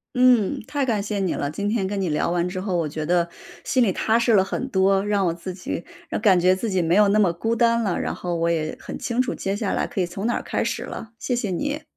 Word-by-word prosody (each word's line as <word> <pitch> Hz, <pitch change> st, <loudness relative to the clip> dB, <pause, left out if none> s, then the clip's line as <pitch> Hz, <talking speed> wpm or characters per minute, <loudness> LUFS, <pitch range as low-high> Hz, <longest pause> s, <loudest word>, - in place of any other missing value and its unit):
嗯， 250 Hz, -5 st, +4 dB
太 285 Hz, -2 st, -1 dB
感 220 Hz, -5 st, 0 dB
谢 205 Hz, 0 st, -3 dB
你 185 Hz, -3 st, 0 dB
了。 145 Hz, -, -2 dB
今 200 Hz, +6 st, -2 dB
天 210 Hz, -4 st, 0 dB
跟 200 Hz, 0 st, -2 dB
你 180 Hz, -, 0 dB
聊 150 Hz, +3 st, 0 dB
完 175 Hz, 0 st, 0 dB
之 185 Hz, 0 st, -4 dB
后， 190 Hz, -1 st, -2 dB
我 165 Hz, -3 st, 0 dB
觉 155 Hz, +1 st, -4 dB
得 170 Hz, 0 st, +2 dB, 0.3 s
心 255 Hz, -, +1 dB
里 195 Hz, -6 st, +3 dB
踏 225 Hz, +1 st, +2 dB
实 235 Hz, -1 st, +3 dB
了 190 Hz, -2 st, +6 dB
很 260 Hz, +7 st, -3 dB
多， 195 Hz, -2 st, +2 dB
让 205 Hz, -2 st, +1 dB
我 170 Hz, -, +1 dB
自 175 Hz, +2 st, -7 dB
己 180 Hz, -1 st, -5 dB, 0.4 s
感 195 Hz, -5 st, +5 dB
觉 180 Hz, +1 st, +4 dB
自 210 Hz, +4 st, -2 dB
己 190 Hz, -2 st, +1 dB
没 170 Hz, +2 st, +2 dB
有 210 Hz, -1 st, +6 dB
那 205 Hz, +2 st, +3 dB
么 185 Hz, -5 st, +4 dB
孤 225 Hz, +7 st, -1 dB
单 235 Hz, 0 st, +3 dB
了， 195 Hz, -5 st, 0 dB
然 -, -, -2 dB
后 175 Hz, -1 st, -3 dB
我 165 Hz, 0 st, +1 dB
也 160 Hz, -2 st, -1 dB
很 -, -, -7 dB
清 240 Hz, +1 st, 0 dB
楚 255 Hz, -, -2 dB
接 195 Hz, +1 st, -2 dB
下 205 Hz, -2 st, -2 dB
来 -, -, 0 dB
可 190 Hz, -, -2 dB
以 180 Hz, -, +2 dB
从 195 Hz, +5 st, -4 dB
哪 240 Hz, -, +1 dB
儿 -, -, -3 dB
开 -, -, -2 dB
始 -, -, -2 dB
了， 220 Hz, -1 st, -7 dB
谢 250 Hz, -, -2 dB
谢 235 Hz, -5 st, -1 dB
你。 290 Hz, -, -2 dB
195 Hz, 300 characters per minute, -23 LUFS, 175-225 Hz, 0.4 s, 了